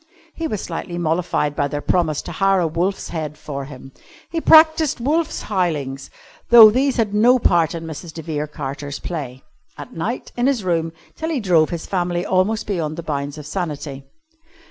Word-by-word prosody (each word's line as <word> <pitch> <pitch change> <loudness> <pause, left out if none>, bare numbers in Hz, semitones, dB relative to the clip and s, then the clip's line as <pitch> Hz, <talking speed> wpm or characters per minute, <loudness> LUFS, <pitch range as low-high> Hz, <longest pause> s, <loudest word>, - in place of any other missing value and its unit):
He 330 - -3
was 215 -10 -3
slightly 175 -1 -5
mollified 165 -3 0
by 145 - 0
their 145 +1 -4
promise 155 0 0
to - - -7
hire 195 +3 +2
a 175 - +1
wolf's 175 +5 -2
head 155 -3 -5
for 140 -2 -6
him. 135 -1 -11 0.4
He 330 -1 -2
practised 315 -3 +5
wolf's 310 +6 -1
howlings 155 -9 -2 0.4
(though 225 -3 +10
these 265 +3 +1
had 215 -3 0
no 240 +5 +5
part 170 -8 +2
in 165 0 -6
Mrs. 160 +1 -7
de 160 0 -8
Vere 150 -2 -3
Carter's 145 0 -6
play) 135 -7 -6 0.3
at 145 - -9
night 210 +10 -4
in 245 +1 +1
his 265 -7 0
room 165 -2 0 0.2
till 320 - -4
he 310 -5 -1
drove 175 -7 +3
his 170 -2 -5
family 175 -1 -1
almost 190 +4 +1
beyond 165 -6 -3
the 170 - -5
bounds 145 -1 -4
of 150 - -9
sanity. 150 -5 -5
170 Hz, 185 wpm, -20 LUFS, 150-210 Hz, 0.4 s, though